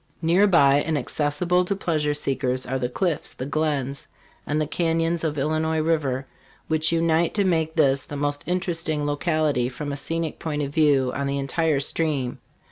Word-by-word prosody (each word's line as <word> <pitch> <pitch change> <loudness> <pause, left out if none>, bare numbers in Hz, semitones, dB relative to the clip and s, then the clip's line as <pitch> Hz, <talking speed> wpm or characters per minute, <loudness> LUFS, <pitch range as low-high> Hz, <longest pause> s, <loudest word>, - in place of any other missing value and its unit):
Near 180 +5 +4
by, 140 -7 +5
and 155 +1 -1
accessible 150 +6 0
to 200 +2 -1
pleasure 155 -6 0
seekers, 130 -3 -1
are 130 +1 -2
the 125 - -1
cliffs, 170 +3 -2
the 130 - -5
glens 140 -2 -2 0.4
and 150 +1 0
the 155 - +1
canyons 165 +1 0
of 155 -2 -1
Illinois 155 +3 0
river, 150 -5 0 0.4
which 160 0 +1
unite 165 0 +2
to 205 - +3
make 160 -3 0
this 140 -4 +3
the 145 - -7
most 145 0 -1
interesting 165 -4 -1
locality 145 -4 0
from 145 +3 -5
a - - -3
scenic 165 +2 -3
point 150 -2 -2
of 140 0 -5
view 145 -5 +3
on 140 0 -2
the 140 0 -1
entire 145 +2 0
stream. 140 -3 -1
155 Hz, 175 wpm, -24 LUFS, 140-165 Hz, 0.4 s, by